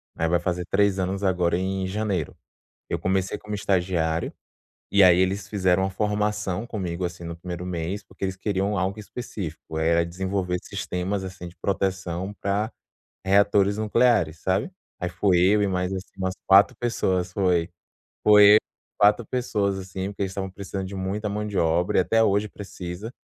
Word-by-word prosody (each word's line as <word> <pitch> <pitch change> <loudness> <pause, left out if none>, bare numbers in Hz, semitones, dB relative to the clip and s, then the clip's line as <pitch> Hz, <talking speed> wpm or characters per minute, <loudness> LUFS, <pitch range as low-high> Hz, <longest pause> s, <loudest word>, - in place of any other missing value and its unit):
né, 80 - 0
vai 85 +1 +2
fazer 90 -1 -2
3 100 -1 +2
anos 95 +2 -2
agora 90 -2 +2
em 95 0 -2
janeiro. 100 -5 -2 0.5
Eu - - 0
comecei 95 +2 -1
como 105 0 -8
estagiário, 90 -5 0 0.6
e 100 - +5
aí 90 -1 +7
eles 95 +2 0
fizeram 95 -2 +2
uma 95 - 0
formação 105 +1 -1
comigo, 90 -4 -3
assim, 85 0 -6
no 85 0 -6
1º 90 +1 -6
mês, 90 +3 -3
porque 100 - -6
eles 95 0 -3
queriam 100 +1 -1
algo 95 +3 -1
específico, 95 -8 -7
era 85 +1 +2
desenvolver 90 +1 -2
sistemas 95 -1 -3
assim 95 -1 -7
de 85 - -12
proteção 95 -1 -2
pra 100 +3 -1 0.6
reatores 100 +1 +4
nucleares, 110 -7 +2
sabe? 95 - 0 0.3
Aí 90 - -2
fui 90 0 +2
eu 100 +4 +4
e 100 - +2
mais, 90 0 -1
assim, 95 0 -5
umas 95 -1 -1
4 95 +1 +6
pessoas, 95 -6 0
foi 90 -4 +2 0.6
foi 105 0 +8
eu, - - +8 0.4
4 105 +3 +4
pessoas 105 -6 -1
assim, 95 0 -5
porque 100 - -5
eles 95 - -1
estavam 95 0 -4
precisando 95 0 -5
de 95 - -8
muita 95 +3 -3
mão 105 +1 -3
de 105 -2 -5
obra 85 +2 +2
e - - +7
até 115 +6 +3
hoje 105 0 +2
precisa, 95 0 -7
95 Hz, 170 wpm, -25 LUFS, 90-100 Hz, 0.6 s, foi